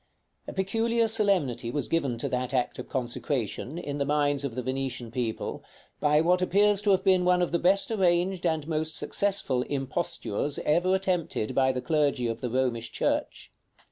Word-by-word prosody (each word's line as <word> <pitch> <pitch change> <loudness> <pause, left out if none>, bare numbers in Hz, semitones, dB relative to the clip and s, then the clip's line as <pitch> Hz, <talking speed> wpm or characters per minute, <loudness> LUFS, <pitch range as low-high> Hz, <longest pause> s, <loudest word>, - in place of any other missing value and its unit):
A - - -6
peculiar 225 +4 +1
solemnity 185 - +1
was 145 +4 -2
given 140 -8 0
to 115 - -2
that 125 +1 -2
act 125 -1 -1
of - - -7
consecration, 130 - -2
in 145 -4 -4
the - - +2
minds 145 -1 +1
of 135 -5 -4
the 125 - -3
Venetian 130 -2 -3
people, 120 -2 -3 0.4
by 150 +1 +3
what 180 +2 +2
appears 200 +2 +3
to 210 - 0
have 190 -1 +3
been 185 -2 +4
one 180 0 +3
of 175 - -2
the 170 - +1
best 195 +5 +2
arranged 180 -2 +1
and 160 -3 0
most 160 0 -1
successful 195 -11 +1
impostures 135 -1 -2
ever 175 +5 +3
attempted 180 - -1
by 130 -1 +3
the 125 -1 -4
clergy 145 -6 +1
of 115 0 -4
the 125 - -2
Romish 120 -2 -1
church. - - -2
150 Hz, 175 wpm, -27 LUFS, 130-185 Hz, 0.4 s, been